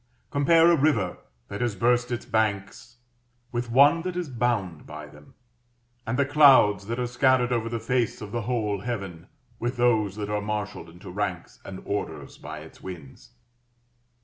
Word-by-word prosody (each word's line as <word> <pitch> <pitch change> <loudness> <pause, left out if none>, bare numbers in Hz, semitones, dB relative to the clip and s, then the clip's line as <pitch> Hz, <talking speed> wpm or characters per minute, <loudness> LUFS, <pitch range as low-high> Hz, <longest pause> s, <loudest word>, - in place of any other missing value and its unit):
Compare 165 +4 +5
a - - +5
river 115 -12 +1 0.3
that 100 +3 -6
has 120 -4 0
burst 120 +4 +2
its 120 -1 -4
banks 110 -2 -2 0.5
with 120 0 -3
one 145 +7 +5
that 180 +1 -4
is 175 -4 -3
bound 115 - -2
by 75 0 -8
them, 75 0 -17 0.7
and 120 +3 -1
the 140 - +3
clouds 135 -9 +5
that 115 +1 -3
are 125 - -1
scattered 125 0 +2
over 115 -2 0
the 115 0 -3
face 120 0 -1
of 105 -1 -8
the 120 - -2
whole 105 -3 -1
heaven 95 -8 -5 0.3
with 120 +2 -2
those 110 -5 +2
that 105 -1 -4
are 105 0 0
marshalled 105 -4 -4
into 90 +2 -11
ranks 95 -2 -4
and 95 -1 -9
orders 100 - -5
by - - -8
its - - -14
winds. 80 -10 -11
115 Hz, 170 wpm, -26 LUFS, 100-125 Hz, 0.7 s, Compare